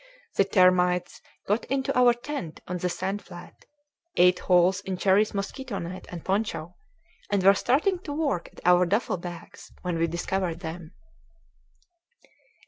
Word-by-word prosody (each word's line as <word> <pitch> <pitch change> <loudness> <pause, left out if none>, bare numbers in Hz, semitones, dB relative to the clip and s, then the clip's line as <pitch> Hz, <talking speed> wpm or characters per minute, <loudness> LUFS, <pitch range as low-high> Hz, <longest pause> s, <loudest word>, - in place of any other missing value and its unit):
The 195 - +4
termites 180 -2 +3 0.3
got 210 +4 0
into 265 0 -1
our 245 -1 +5
tent 240 - -6
on 180 0 -3
the 180 - -1
sand 190 +4 -3
flat, 175 - -13 0.5
ate 180 0 +5
holes 180 +1 +3
in 190 -2 -4
Cherrie's 200 +3 +2
mosquito 205 +3 -4
net 180 +2 -7
and 175 -2 -8
poncho, 190 -4 -2 0.5
and 200 -2 +1
were 195 +1 +8
starting 310 - +1
to 325 - -8
work 290 - -1
at - - -15
our 180 0 +5
duffel 205 +1 0
bags, 170 -1 -10
when 175 -2 -2
we 165 - +2
discovered 170 0 -2
them. 165 -1 -7
185 Hz, 145 wpm, -26 LUFS, 175-205 Hz, 0.5 s, were